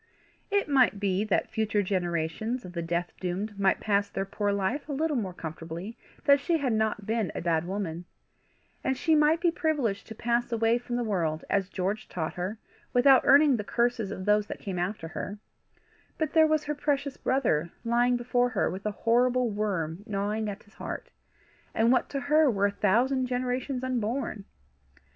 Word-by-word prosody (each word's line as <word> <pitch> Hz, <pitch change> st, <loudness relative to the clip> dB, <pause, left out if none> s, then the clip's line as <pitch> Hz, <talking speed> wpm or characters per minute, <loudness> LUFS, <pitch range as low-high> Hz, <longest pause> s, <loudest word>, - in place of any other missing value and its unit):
It 405 Hz, 0 st, +1 dB
might 255 Hz, -7 st, +3 dB
be 195 Hz, 0 st, +1 dB
that 210 Hz, -, 0 dB
future 220 Hz, -2 st, 0 dB
generations 185 Hz, +5 st, -2 dB
of 180 Hz, -, -9 dB
the 170 Hz, -, -3 dB
death 170 Hz, +1 st, -2 dB
doomed 195 Hz, +3 st, -3 dB
might 195 Hz, -1 st, +3 dB
pass 200 Hz, -1 st, +1 dB
their 195 Hz, -, -3 dB
poor 205 Hz, +1 st, -1 dB
life 200 Hz, +10 st, -1 dB
a -, -, -2 dB
little 305 Hz, +2 st, 0 dB
more 205 Hz, -7 st, -1 dB
comfortably 165 Hz, +5 st, -7 dB, 0.3 s
that 280 Hz, 0 st, +6 dB
she 330 Hz, +4 st, +1 dB
had 265 Hz, -6 st, 0 dB
not 215 Hz, -1 st, 0 dB
been 220 Hz, -4 st, -1 dB
a -, -, -3 dB
bad 165 Hz, -1 st, +1 dB
woman, 180 Hz, -3 st, -4 dB, 0.8 s
and 265 Hz, -, 0 dB
she 325 Hz, -, +2 dB
might 305 Hz, +1 st, +4 dB
be 340 Hz, -1 st, +2 dB
privileged 285 Hz, -, -1 dB
to 220 Hz, -, -8 dB
pass 240 Hz, +2 st, 0 dB
away 230 Hz, +1 st, +2 dB
from 240 Hz, 0 st, -5 dB
the 245 Hz, -, 0 dB
world, 165 Hz, -8 st, -1 dB
as 195 Hz, -2 st, +1 dB
George 195 Hz, +3 st, -3 dB
taught 160 Hz, -2 st, -3 dB
her, 185 Hz, +5 st, -4 dB, 0.4 s
without 260 Hz, +2 st, +6 dB
earning 285 Hz, -2 st, +6 dB
the 210 Hz, -, -3 dB
curses 235 Hz, -1 st, 0 dB
of 185 Hz, -2 st, -6 dB
those 210 Hz, 0 st, +3 dB
that -, -, -5 dB
came 190 Hz, -3 st, -5 dB
after 175 Hz, -2 st, -3 dB
her; 205 Hz, +4 st, -5 dB, 0.8 s
but 315 Hz, -2 st, -1 dB
there 320 Hz, -1 st, +6 dB
was 310 Hz, -1 st, +1 dB
her 295 Hz, -, -2 dB
precious 285 Hz, -1 st, -1 dB
brother 195 Hz, -, +1 dB, 0.2 s
lying 240 Hz, +1 st, +3 dB
before 245 Hz, 0 st, +1 dB
her 220 Hz, -5 st, 0 dB
with 195 Hz, +3 st, -5 dB
a -, -, 0 dB
horrible 245 Hz, +1 st, +3 dB
worm 190 Hz, -5 st, -2 dB
gnawing 210 Hz, +1 st, -1 dB
at 205 Hz, 0 st, -7 dB
his 205 Hz, -, -24 dB
heart, -, -, -7 dB, 0.6 s
and 230 Hz, +2 st, +4 dB
what 255 Hz, -, +2 dB
to 275 Hz, -, -3 dB
her 300 Hz, +1 st, +4 dB
were 200 Hz, -4 st, +1 dB
a 200 Hz, -, +2 dB
thousand 245 Hz, +6 st, +2 dB
generations 250 Hz, +1 st, -2 dB
unborn! 240 Hz, -3 st, -2 dB
220 Hz, 185 wpm, -28 LUFS, 195-255 Hz, 0.8 s, that